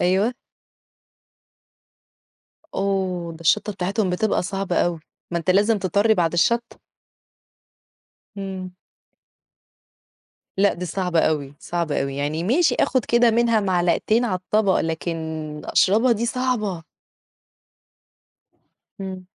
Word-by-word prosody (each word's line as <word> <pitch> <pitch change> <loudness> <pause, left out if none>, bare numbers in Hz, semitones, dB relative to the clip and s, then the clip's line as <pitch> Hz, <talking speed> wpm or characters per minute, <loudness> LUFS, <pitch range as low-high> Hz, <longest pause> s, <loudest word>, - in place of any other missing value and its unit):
أيوه. 190 +7 +2 2.4
أوه! 190 -3 -1
ده 160 - -13
الشطة 210 +5 +2
بتاعتهم 190 +1 -1
بتبقى 200 +3 0
صعبة 195 -1 -3
أوي، 170 -2 +1 0.3
ما 170 - 0
أنت 170 - -1
لازم 205 +3 +3
تطرّي 200 +4 +2
بَعد 170 -4 +1
الشطة. 235 +8 +1 1.6
إمم. 190 -2 -6 1.8
لأ 200 +1 +4
دي 180 +1 -5
صعبة 180 -1 0
أوي، 145 -3 -1
صعبة 170 -5 -2
أوي، 135 0 -4
يعني 150 +4 -2
ماشي 305 - +3
آخد 255 -4 +1
كده 235 0 +4
منها 230 -1 +3
معلقتين 190 +5 +1
على 200 -6 0
الطبق، 195 +1 +1
لكن 165 +1 -2 0.5
أشربها 225 +6 +3
دي 230 +2 -1
صعبة. 225 -9 -1 2.2
إمم. 190 -1 -6
190 Hz, 105 wpm, -22 LUFS, 175-215 Hz, 2.4 s, لأ